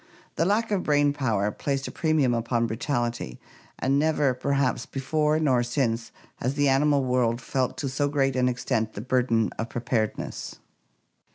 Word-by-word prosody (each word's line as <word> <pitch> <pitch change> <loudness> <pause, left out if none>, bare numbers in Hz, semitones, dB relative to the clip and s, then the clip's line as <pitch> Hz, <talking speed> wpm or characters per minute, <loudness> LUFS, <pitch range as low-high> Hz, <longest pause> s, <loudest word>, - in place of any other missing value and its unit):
The 165 - +1
lack 215 +4 +1
of 200 -3 +1
brain 145 -2 +2
power 110 -7 0
placed 135 +4 -2
a - - -6
premium 155 -6 +2
upon 115 0 0
brutality, 120 - -2 0.4
and 135 +2 +1
never, 150 -3 +2
perhaps, 135 -1 0
before 150 +3 0
nor 130 -6 +3
since 120 -2 -1 0.3
has 130 +3 -2
the 145 -1 +3
animal 140 0 +3
world 125 -2 +1
felt 130 +1 -2
to 140 - -2
so 140 +2 0
great 135 -2 +1
an 125 0 +2
extent 120 -3 -1
the - - -6
burden 120 -4 +1
of 115 - -2
preparedness. 115 -2 -3
130 Hz, 160 wpm, -26 LUFS, 120-145 Hz, 0.4 s, nor